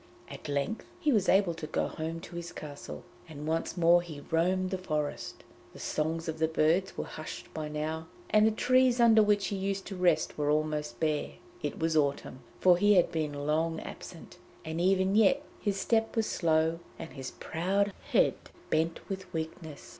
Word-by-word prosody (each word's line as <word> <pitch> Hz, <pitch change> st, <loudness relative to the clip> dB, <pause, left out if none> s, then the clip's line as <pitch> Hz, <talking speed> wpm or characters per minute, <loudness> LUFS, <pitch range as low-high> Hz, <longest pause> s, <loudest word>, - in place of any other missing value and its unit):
At -, -, -8 dB
length 145 Hz, +10 st, -1 dB, 0.2 s
he 305 Hz, -4 st, +2 dB
was 210 Hz, -6 st, +2 dB
able 190 Hz, -2 st, +4 dB
to 160 Hz, -2 st, -7 dB
go -, -, 0 dB
home 165 Hz, +1 st, -5 dB
to 170 Hz, -, -10 dB
his 170 Hz, 0 st, -5 dB
castle, 145 Hz, -2 st, -8 dB, 0.3 s
and 150 Hz, -1 st, -8 dB
once 165 Hz, +3 st, -1 dB
more 175 Hz, 0 st, +5 dB
he 155 Hz, -4 st, -9 dB
roamed 185 Hz, +3 st, +1 dB
the 190 Hz, -, -2 dB
forest. 150 Hz, -5 st, -3 dB, 0.3 s
The -, -, -12 dB
songs 160 Hz, +2 st, -2 dB
of 160 Hz, 0 st, -4 dB
the 160 Hz, -, +3 dB
birds 160 Hz, +4 st, +1 dB
were -, -, -1 dB
hushed 155 Hz, -, -8 dB
by 155 Hz, -1 st, -4 dB
now, 155 Hz, +2 st, -3 dB, 0.2 s
and 215 Hz, 0 st, +6 dB
the -, -, +3 dB
trees 255 Hz, +2 st, +3 dB
under 225 Hz, -2 st, +7 dB
which 205 Hz, -2 st, +2 dB
he 200 Hz, -, -2 dB
used 195 Hz, 0 st, -2 dB
to 195 Hz, -, -6 dB
rest 180 Hz, -4 st, +1 dB
were 145 Hz, 0 st, +1 dB
almost 150 Hz, -5 st, -1 dB
bare. 155 Hz, -2 st, 0 dB, 0.3 s
It -, -, -3 dB
was 160 Hz, 0 st, 0 dB
autumn, 140 Hz, -3 st, 0 dB, 0.2 s
for 180 Hz, -1 st, +6 dB
he 205 Hz, +1 st, +5 dB
had 180 Hz, -, +4 dB
been 145 Hz, -3 st, -2 dB
long 160 Hz, +2 st, +1 dB
absent, -, -, -10 dB, 0.3 s
and 160 Hz, +1 st, -3 dB
even 190 Hz, +1 st, +3 dB
yet 225 Hz, +7 st, +4 dB, 0.2 s
his 200 Hz, -2 st, -1 dB
step 225 Hz, +1 st, +1 dB
was 225 Hz, -1 st, +2 dB
slow 160 Hz, -2 st, +1 dB, 0.2 s
and 160 Hz, -, -8 dB
his 135 Hz, -2 st, -6 dB
proud 195 Hz, +4 st, -1 dB, 0.2 s
head -, -, +4 dB, 0.4 s
bent 165 Hz, +1 st, 0 dB
with 190 Hz, -2 st, -6 dB
weakness. 160 Hz, -1 st, -6 dB
165 Hz, 185 wpm, -30 LUFS, 155-195 Hz, 0.4 s, under